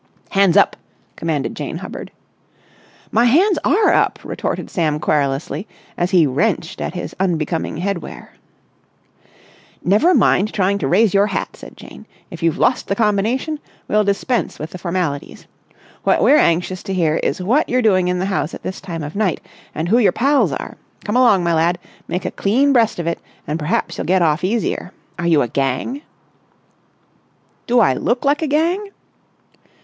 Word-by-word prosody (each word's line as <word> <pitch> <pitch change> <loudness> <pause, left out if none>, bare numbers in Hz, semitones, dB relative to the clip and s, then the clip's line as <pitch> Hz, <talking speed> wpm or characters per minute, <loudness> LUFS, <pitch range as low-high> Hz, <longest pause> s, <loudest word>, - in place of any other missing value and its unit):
"Hands 195 -3 +4
up!" - - +4 0.4
commanded 155 -4 -2
Jane - - -5
Hubbard. - - -8 1.0
"My 230 +3 +3
hands 335 - +4
are 415 +2 +3
up!" - - +2
retorted - - -4
Sam 155 -4 0
querulously, 145 +4 -1 0.3
as 175 0 -1
he 180 -4 +4
wrenched 170 +5 -1
at - - -4
his 175 - -5
unbecoming 165 -4 -1
head 190 +1 -1
wear. - - -11 1.5
"Never 215 - +4
mind 210 +4 +3
trying 200 0 +1
to 135 - -1
raise 205 +7 +3
your 200 +1 +4
hat," 195 - -3
said - - -13
Jane. - - -13 0.2
"If 170 - -9
you've 165 -2 +1
lost 250 - +1
the 195 - 0
combination, 225 +8 0 0.3
we'll 210 0 +2
dispense 205 +5 -1
with 155 +1 -7
the 185 - -8
formalities. 170 -5 -3 0.6
What - - +2
we're 290 - +6
anxious 175 +2 +1
to 195 - -4
hear 160 -3 +1
is - - -1
what 245 +11 +2
you're 250 0 +1
doing 185 -4 +3
in 180 0 0
the 185 - -1
house 190 -4 -2
at - - -12
this 185 - -5
time 165 -4 -6
of 150 +4 -7
night, 200 -5 0 0.4
and 160 - -2
who 230 +7 +4
your 215 - +4
pals 275 +5 +2
are. - - -6 0.3
Come 210 - -2
along, 235 -8 +4
my 170 -1 +1
lad, 165 +2 +2 0.3
make 180 - -3
a - - -2
clean 265 +8 +2
breast 230 -3 +3
of 170 - -3
it 170 0 -2 0.3
and 150 +3 -3
perhaps 150 +2 -2
you'll - - -2
get 185 -1 +3
off 155 0 +1
easier. 195 -2 -1 0.3
Are 170 - -1
you 160 -4 +4
a - - -2
gang?" 135 - -2 1.7
"Do 245 0 +3
I 195 - +4
look 240 - -1
like 285 +2 +2
a 315 - 0
gang?" 340 +8 0
190 Hz, 175 wpm, -19 LUFS, 165-230 Hz, 1.7 s, we're